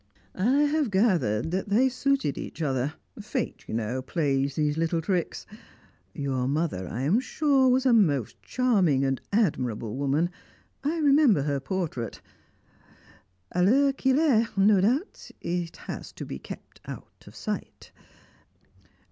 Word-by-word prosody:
I 255 Hz, +10 st, +2 dB
have 295 Hz, -3 st, +1 dB
gathered 180 Hz, -, +1 dB
that 190 Hz, +2 st, -2 dB
they 235 Hz, +6 st, +4 dB
suited 260 Hz, -, 0 dB
each 165 Hz, -, -6 dB
other 135 Hz, +1 st, -1 dB, 0.2 s
fate, -, -, -4 dB
you -, -, -4 dB
know, 115 Hz, +3 st, -2 dB
plays 140 Hz, -1 st, 0 dB
these 150 Hz, -1 st, +1 dB
little 165 Hz, +1 st, 0 dB
tricks. 175 Hz, 0 st, -2 dB, 0.7 s
Your 135 Hz, -4 st, -2 dB
mother, 140 Hz, -, -1 dB
I 120 Hz, -, -4 dB
am 165 Hz, -, +3 dB
sure, 270 Hz, -1 st, +2 dB
was 255 Hz, +1 st, +2 dB
a 255 Hz, -, +5 dB
most 145 Hz, -, +2 dB
charming 190 Hz, -, +2 dB
and 135 Hz, -1 st, -1 dB
admirable 125 Hz, -, 0 dB
woman 145 Hz, +5 st, 0 dB, 0.5 s
I 305 Hz, +4 st, 0 dB
remember 280 Hz, -, +4 dB
her 140 Hz, -1 st, -1 dB
portrait. 135 Hz, -, -4 dB, 1.3 s
A 180 Hz, -, 0 dB
l'heure 270 Hz, +9 st, +4 dB
qu'il 265 Hz, 0 st, +1 dB
est, 235 Hz, -9 st, +2 dB
no 195 Hz, 0 st, +5 dB
doubt, 260 Hz, -, -1 dB
it 175 Hz, -1 st, -3 dB
has -, -, -7 dB
to -, -, -7 dB
be 65 Hz, -, -6 dB
kept -, -, -11 dB
out -, -, -10 dB
of -, -, -13 dB
sight. -, -, -6 dB
175 Hz, 140 wpm, -27 LUFS, -, 1.3 s, a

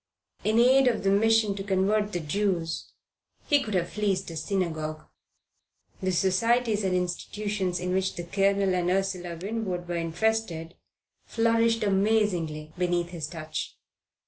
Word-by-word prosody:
In 215 Hz, +1 st, +2 dB
aid 260 Hz, +3 st, +6 dB
of 230 Hz, -5 st, +1 dB
the 195 Hz, -, +3 dB
Mission 220 Hz, 0 st, +3 dB
to 195 Hz, 0 st, -5 dB
Convert 205 Hz, +2 st, +1 dB
the 175 Hz, -, -2 dB
Jews 170 Hz, 0 st, -2 dB, 0.5 s
he 290 Hz, -2 st, +3 dB
could 215 Hz, -6 st, -3 dB
have 175 Hz, -1 st, 0 dB
fleeced 195 Hz, -4 st, -1 dB
a -, -, -7 dB
synagogue. 155 Hz, -2 st, -2 dB, 1.0 s
The 185 Hz, 0 st, 0 dB
societies 215 Hz, +5 st, +2 dB
and 185 Hz, -1 st, +1 dB
institutions 185 Hz, +1 st, -2 dB
in 180 Hz, 0 st, -2 dB
which 190 Hz, 0 st, 0 dB
the 175 Hz, -, -5 dB
Colonel 195 Hz, +2 st, +1 dB
and 180 Hz, -1 st, 0 dB
Ursula 185 Hz, -2 st, -1 dB
Winwood 190 Hz, -3 st, -3 dB
were 175 Hz, 0 st, -2 dB
interested 170 Hz, -1 st, -1 dB, 0.5 s
flourished 230 Hz, 0 st, +2 dB
amazingly 190 Hz, -7 st, +1 dB
beneath 175 Hz, -1 st, 0 dB
his 165 Hz, -4 st, -5 dB
touch. 155 Hz, -1 st, -6 dB
190 Hz, 140 wpm, -27 LUFS, 175-215 Hz, 1.0 s, aid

